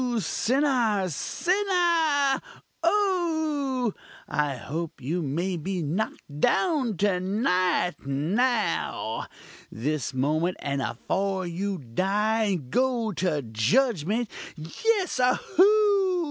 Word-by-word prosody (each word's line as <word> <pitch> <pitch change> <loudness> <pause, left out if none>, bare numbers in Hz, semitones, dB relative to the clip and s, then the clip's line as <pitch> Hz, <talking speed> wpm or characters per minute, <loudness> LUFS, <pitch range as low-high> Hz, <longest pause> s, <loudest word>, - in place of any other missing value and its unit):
sinner! 230 - +1
sinner! 340 - +1 0.4
oh! 315 - +1 0.3
I 145 -2 0
hope 160 +6 -5
you 155 +7 -2
may 170 +5 -2
be 180 +2 -3
knock'd 150 -3 -4
down 265 - +2
to 195 -1 +2
night 185 -3 0
now! 170 - 0 0.4
this 145 +4 -2
moment 155 +7 0
and 140 -1 -2
afore 190 +10 -2
you 190 +3 -3
die 200 - 0
and 175 -11 -2
go 245 -3 +1
to 160 -5 -1
judgment! 190 - +1 0.3
Yes! 370 - -1
oho! 390 +7 +3
200 Hz, 90 wpm, -26 LUFS, -, 0.4 s, oho